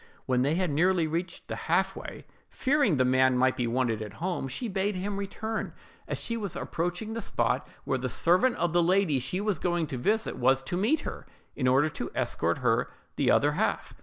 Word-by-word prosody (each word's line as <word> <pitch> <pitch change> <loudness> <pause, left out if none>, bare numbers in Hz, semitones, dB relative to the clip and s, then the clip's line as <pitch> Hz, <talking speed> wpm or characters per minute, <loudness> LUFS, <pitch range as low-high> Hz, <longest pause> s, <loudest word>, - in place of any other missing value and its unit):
When 125 -1 +1
they 145 +5 +2
had 180 -3 0
nearly 175 +3 +3
reached 170 +3 -4
the - - -4
half - - 0
way, - - -8 0.2
fearing 270 - +2
the 130 - +3
man 130 0 +4
might 130 +1 +3
be 120 - -1
wanted 115 -2 0
at 105 -2 -6
home, 175 -5 -2
she 185 - -3
bade 195 0 -1
him 195 +2 -3
return, 220 +3 -4 0.3
as - - -3
she 230 - -3
was 200 -6 -3
approaching 175 +6 -3
the 230 - -3
spot - - 0 0.2
where 130 - -1
the 130 0 -2
servant 185 - +3
of 170 -1 -1
the 175 - +4
lady 175 -5 +3
she 135 +9 -2
was 205 -4 -1
going 175 -2 0
to 135 -4 -5
visit 220 - 0
was 130 +2 +3
to 155 - -4
meet 220 - +2
her, - - -7 0.3
in 130 - 0
order 135 +4 +4
to - - -5
escort - - 0
her - - +2 0.3
the - - +1
other - - +4
half. - - -1
170 Hz, 210 wpm, -28 LUFS, 130-200 Hz, 0.3 s, man